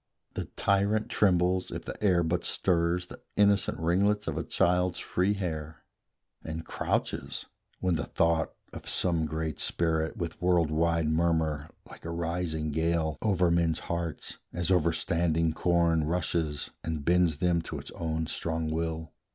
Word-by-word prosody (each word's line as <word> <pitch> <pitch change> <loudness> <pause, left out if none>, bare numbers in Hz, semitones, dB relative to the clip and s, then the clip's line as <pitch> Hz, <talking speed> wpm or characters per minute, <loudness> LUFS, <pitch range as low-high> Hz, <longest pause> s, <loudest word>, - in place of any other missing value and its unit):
The - - -3
tyrant 100 +2 +2
trembles, 90 -2 +2
if - - -6
the - - -5
air 90 -4 +4
but 85 +2 0
stirs 85 0 +1
The - - -12
innocent 100 -1 +3
ringlets 100 +5 +2
of - - -1
a - - -1
child's 90 0 +1
free 95 +3 +1
hair, 80 -5 -4 0.6
And 80 0 -5
crouches, - - -2 0.4
when 90 -3 +2
the - - -2
thought 85 -1 +1 0.2
of - - -7
some 85 -3 +1
great 80 0 -3
spirit, 80 -1 0
With 85 -2 -5
world 90 -3 +3
wide 85 0 +2
murmur, 80 -2 +1 0.2
like - - -13
a 85 - -5
rising 85 -2 -2
gale, 80 -1 0
Over 90 -5 +2
men's 85 -2 +2 0.2
hearts, 85 -2 -4
as 85 0 -1
over 85 -2 +4
standing 85 -2 +1
corn, 85 -2 +2
Rushes, 80 -3 -1
and 80 -3 -3
bends 85 -3 +3
them 85 0 +2
to - - -6
its - - -8
own 80 -1 -2
strong 80 0 -2
will. 80 0 -2
85 Hz, 150 wpm, -29 LUFS, 80-90 Hz, 0.6 s, air